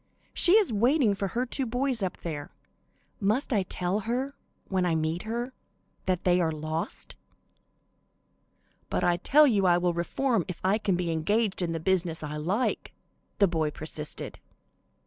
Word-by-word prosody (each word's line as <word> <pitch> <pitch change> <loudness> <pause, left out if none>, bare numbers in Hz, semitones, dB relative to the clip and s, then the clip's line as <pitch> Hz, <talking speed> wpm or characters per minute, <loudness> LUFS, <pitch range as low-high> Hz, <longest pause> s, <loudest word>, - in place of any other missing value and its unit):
She 355 - +5
is 420 - +5
waiting 240 +1 +3
for 195 0 -2
her 240 +6 -1
two 255 +1 -1
boys 250 0 0
up 190 -2 -2
there. 150 -4 -5 0.7
Must 220 +7 +1
I 205 - +3
tell 185 +1 -1
her, 250 +6 -2 0.3
when 190 -1 0
I 175 -2 +1
meet 160 +2 -1
her, 240 +3 -3 0.5
that 185 -2 0
they 180 0 +3
are 165 -2 +1
lost?" 155 +1 -3 1.7
"But - - -1
I 175 -1 +3
tell 295 +11 +5
you 205 -8 +3
I 175 -1 +5
will 175 0 +1
reform 220 +6 0
if 180 - -6
I 195 +4 +2
can 195 -4 +1
be 175 -1 -1
engaged 195 +6 +1
in 170 -2 0
the 165 - -2
business 170 -2 0
I 150 0 -4
like," 190 +11 -1 0.4
the 200 - +5
boy 160 -3 0
persisted. 150 0 -6
190 Hz, 165 wpm, -28 LUFS, 170-235 Hz, 1.7 s, She